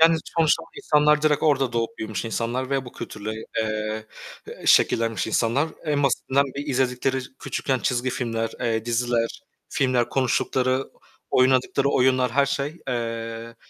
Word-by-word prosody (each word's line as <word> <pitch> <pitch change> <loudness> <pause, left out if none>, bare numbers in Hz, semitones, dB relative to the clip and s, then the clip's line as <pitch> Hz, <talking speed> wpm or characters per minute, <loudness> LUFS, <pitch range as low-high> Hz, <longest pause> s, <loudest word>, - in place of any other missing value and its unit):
yani, 165 0 +7 0.2
sonuçta 160 -2 +3
o - - -13
insanlar 150 - +3
direkt 150 -1 +2
orada 135 -5 +2
doğup 115 -1 -2
büyümüş 110 -1 -4
insanlar 120 +3 -2
ve 135 -1 0
bu 125 - -10
kültürle, 105 +1 -6 0.3
eee, 110 0 -2 0.6
şekillenmiş 115 -3 +3
insanlar. 120 +7 +1 0.2
En 145 -2 +1
basitinden 135 +1 +2
bir 145 - -4
izledikleri 130 -1 0 0.2
küçükken 130 -2 -1
çizgi 125 +1 0
filmler, 115 -3 -2
eee, 115 -2 0
diziler, 120 -1 -1 0.3
filmler, 125 -3 +1
konuştukları, 130 0 0 0.4
oynadıkları 130 +2 +3
oyunlar, 130 -2 +3
her 140 +3 +3
şey, 140 +4 -3
eee, 115 -1 -4
125 Hz, 135 wpm, -24 LUFS, 115-140 Hz, 0.6 s, yani